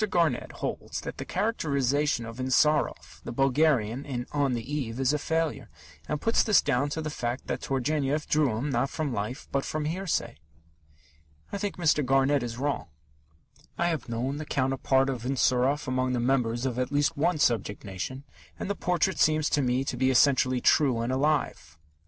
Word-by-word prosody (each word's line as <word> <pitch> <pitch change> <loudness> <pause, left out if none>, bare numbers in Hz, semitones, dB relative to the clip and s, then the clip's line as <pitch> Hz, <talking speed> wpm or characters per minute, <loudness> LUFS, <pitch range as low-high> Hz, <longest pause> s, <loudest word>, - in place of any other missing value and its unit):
Garnett 165 -9 +1
holds - - -4
that - - -7
the - - -4
characterization 145 - 0
of 115 +2 -9
Insarov, 130 +4 +1
the - - -6
Bulgarian, 135 -2 +2
in 125 -4 -4
On 140 -3 +1
the 120 +4 -4
Eve, 125 -5 -3
is 135 +1 +2
a 150 - 0
failure, 160 +2 -1 0.4
and 150 - -1
puts 225 +7 +2
this 210 -7 +5
down 140 -1 +1
to 160 +2 -3
the 155 - -3
fact 120 -2 -3
that - - -3
Turgenev 140 +2 -1
drew 145 -8 +2
him, 140 +5 -2
not 125 +2 +1
from 150 -4 -3
life, 110 +5 -4
but 140 0 0
from 155 -1 -3
hearsay. 165 -7 -2 1.1
I 200 - -3
think 205 -1 -3
Mr. 160 -3 +2
Garnett 135 +2 +3
is 120 -1 -5
wrong. 140 - -2 0.9
I 175 - +1
have 155 -8 -3
known 125 +5 -2
the 155 - -5
counterpart 135 0 +1
of 130 -4 -3
Insarov 130 +3 +1
among 130 0 0
the 125 - 0
members 120 -1 +1
of 125 -2 -2
at 125 +1 -1
least 145 0 +1
one 160 +4 +1
subject 115 -8 0
nation, 100 +8 -5 0.3
and 200 - -3
the - - -2
portrait 180 +1 0
seems 155 -1 +3
to 145 - +2
me 125 0 +1
to 135 - -3
be 130 +1 +2
essentially 130 -1 +3
true 135 -6 +3
and 120 +2 -1
alive. 135 - -1
135 Hz, 180 wpm, -27 LUFS, 125-150 Hz, 1.1 s, this